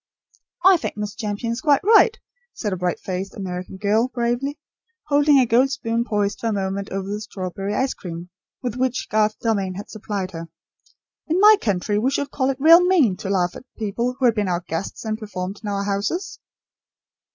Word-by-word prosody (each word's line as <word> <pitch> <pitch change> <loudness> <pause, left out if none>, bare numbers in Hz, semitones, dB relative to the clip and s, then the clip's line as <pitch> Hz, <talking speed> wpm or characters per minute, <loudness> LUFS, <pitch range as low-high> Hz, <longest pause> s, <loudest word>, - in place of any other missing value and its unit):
"I 380 -1 +8
think 315 - -5
Miss 210 -1 -4
Champion 210 +1 -3
is 235 - -5
quite 290 -3 +3
right," 450 +3 +5 0.4
said 210 -4 -2
a - - 0
bright 180 -1 -2
faced 190 +1 -5
American 185 -1 -6
girl, 215 +4 +2
bravely, 250 +3 -2 0.5
holding 290 0 +5
a 260 - +5
gold 245 +4 +3
spoon 235 -4 -1
poised 205 -3 -1
for 230 - -2
a - - +1
moment 195 0 -2
over 195 0 -4
the 205 +1 -4
strawberry 195 -1 -4
ice 265 +3 0
cream 170 0 -8 0.3
with 245 -3 -2
which 255 0 -1
Garth 215 0 +2
Dalmain 200 -5 -1
had 200 - -8
supplied 205 -3 -4
her. 165 -1 -7 0.8
"In 330 +3 +1
my 425 +2 +8
country 205 0 0
we 245 +5 +2
should 280 +1 -2
call 260 -1 0
it 270 - -1
real 330 +5 +8
mean 330 - +3
to 190 - -5
laugh, 180 -3 +1
at - - -8 0.2
people 235 +4 -2
who 265 - 0
had 235 - +5
been 210 -2 -1
our 175 0 -1
guests 165 +7 -4
and 215 0 -2
performed 195 -2 -5
in 210 - -5
our 200 0 -1
houses." 210 - -2
215 Hz, 195 wpm, -22 LUFS, 195-260 Hz, 0.8 s, I